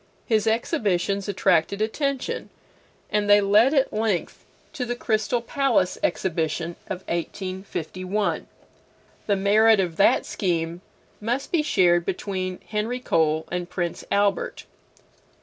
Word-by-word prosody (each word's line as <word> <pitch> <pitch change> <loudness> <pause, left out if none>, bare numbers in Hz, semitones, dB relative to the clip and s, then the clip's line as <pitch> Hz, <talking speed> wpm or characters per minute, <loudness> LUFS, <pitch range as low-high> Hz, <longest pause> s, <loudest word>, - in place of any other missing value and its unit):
His 220 -2 +1
exhibitions 200 - 0
attracted 185 -1 +2
attention, 270 +5 -2 0.6
and 210 -1 +1
they 205 0 +8
led 205 +6 +4
at 270 -1 +2
length 215 -5 -1 0.3
to 255 - -3
the 245 0 -2
Crystal 230 0 0
Palace 240 -8 +1
Exhibition 170 -2 -1 0.2
of 185 -1 -4
1851. 185 +2 -3 0.8
The 205 - +3
merit 210 +2 +4
of 175 -4 -1
that 195 - +4
scheme 170 -2 -2 0.4
must 240 +5 -2
be 335 - +3
shared 175 - +3
between 185 0 -3
Henry 220 +4 -2
Cole 160 -7 +1
and 175 0 -3
Prince 175 -2 -3
Albert. 200 0 0
200 Hz, 115 wpm, -24 LUFS, 180-220 Hz, 0.8 s, they